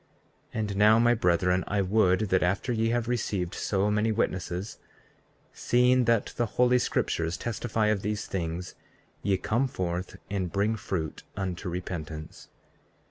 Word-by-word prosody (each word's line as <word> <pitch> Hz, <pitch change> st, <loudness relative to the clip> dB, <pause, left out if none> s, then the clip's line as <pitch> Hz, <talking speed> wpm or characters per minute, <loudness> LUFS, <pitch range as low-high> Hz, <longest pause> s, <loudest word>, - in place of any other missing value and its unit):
34:30 -, -, -1 dB
And 105 Hz, -2 st, -2 dB
now, 105 Hz, +2 st, +6 dB
my 120 Hz, +1 st, +5 dB
brethren, 90 Hz, -3 st, +2 dB
I 100 Hz, -1 st, +1 dB
would 95 Hz, -1 st, +3 dB
that, 95 Hz, -1 st, +3 dB
after 100 Hz, +8 st, 0 dB
ye 115 Hz, 0 st, +1 dB
have 120 Hz, 0 st, 0 dB
received 100 Hz, -7 st, -1 dB
so 100 Hz, +1 st, 0 dB
many 105 Hz, +2 st, +2 dB
witnesses, 95 Hz, -2 st, -2 dB, 0.7 s
seeing 125 Hz, +1 st, +3 dB
that 115 Hz, -2 st, +1 dB
the 120 Hz, -, +1 dB
holy 125 Hz, 0 st, +5 dB
scriptures 85 Hz, -7 st, -1 dB
testify 115 Hz, -1 st, -1 dB
of 105 Hz, -2 st, +1 dB
these 105 Hz, +1 st, -2 dB
things, 85 Hz, 0 st, -4 dB, 0.5 s
ye 100 Hz, -2 st, +1 dB
come 120 Hz, +8 st, 0 dB
forth 90 Hz, -5 st, -3 dB
and 95 Hz, -4 st, -2 dB
bring 105 Hz, +3 st, +1 dB
fruit 95 Hz, -8 st, -4 dB, 0.2 s
unto 95 Hz, -1 st, -3 dB
repentance. 80 Hz, -3 st, -6 dB
100 Hz, 145 wpm, -28 LUFS, 90-115 Hz, 0.7 s, now